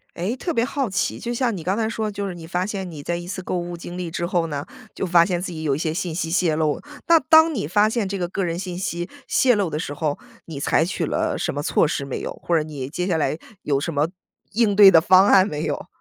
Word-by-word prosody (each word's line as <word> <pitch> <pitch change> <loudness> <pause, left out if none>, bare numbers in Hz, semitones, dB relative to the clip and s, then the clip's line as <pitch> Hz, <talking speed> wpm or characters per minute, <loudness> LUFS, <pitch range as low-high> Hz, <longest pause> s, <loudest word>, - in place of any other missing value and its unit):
诶， 200 +9 -2
特 340 +4 -3
别 230 - +2
好 270 -1 -2
奇， 185 -3 -1
就 240 0 -4
像 235 -4 0
你 160 - -7
刚 190 +3 0
才 220 -1 0
说 220 -1 -2
的 210 - -3
就 200 0 -4
是 180 - -5
你 165 -1 -9
发 180 +2 -1
现 195 -2 -4
你 155 -4 -8
在 170 +3 -2
一 175 0 -7
次 185 0 -5
购 180 - -2
物 175 0 -5
经 175 +1 -8
历 170 -2 -4
之 170 - -2
后 175 -2 0
呢， 145 -2 -4 0.3
就 - - -3
发 170 -2 +5
现 180 -1 -2
自 190 - -4
己 160 -2 -6
有 140 -3 +1
一 - - -3
些 155 -1 -1
信 175 -2 -3
息 165 -1 -2
泄 170 -2 +2
露。 155 -1 0 0.3
那 335 -1 +7
当 320 +1 +5
你 205 - -2
发 205 +6 +3
现 220 -3 -1
这 200 - -3
个 175 -2 -2
个 195 +1 -2
人 170 -1 -2
信 180 -1 -5
息 175 -1 -3 0.2
泄 250 -4 +3
露 200 -4 0
的 150 - -4
时 150 -2 -4
候， 145 -1 -2 0.3
你 155 -4 -7
采 155 - +2
取 175 -1 -2
了 - - -1
什 - - -2
么 145 - -3
措 155 - +2
施 140 - -2
没 135 - -5
有？ - - -4
或 170 - +2
者 155 - +2
你 145 -4 -6
接 180 +6 -3
下 170 - +1
来 155 0 0 0.3
有 140 -2 0
什 165 +2 -3
么 145 +2 +1 0.4
应 210 -2 +2
对 205 -2 +10
的 170 -4 +7
方 185 +3 +6
案 195 0 +5
没 150 +1 -4
有？ - - -3
175 Hz, 305 characters per minute, -22 LUFS, 160-200 Hz, 0.4 s, 对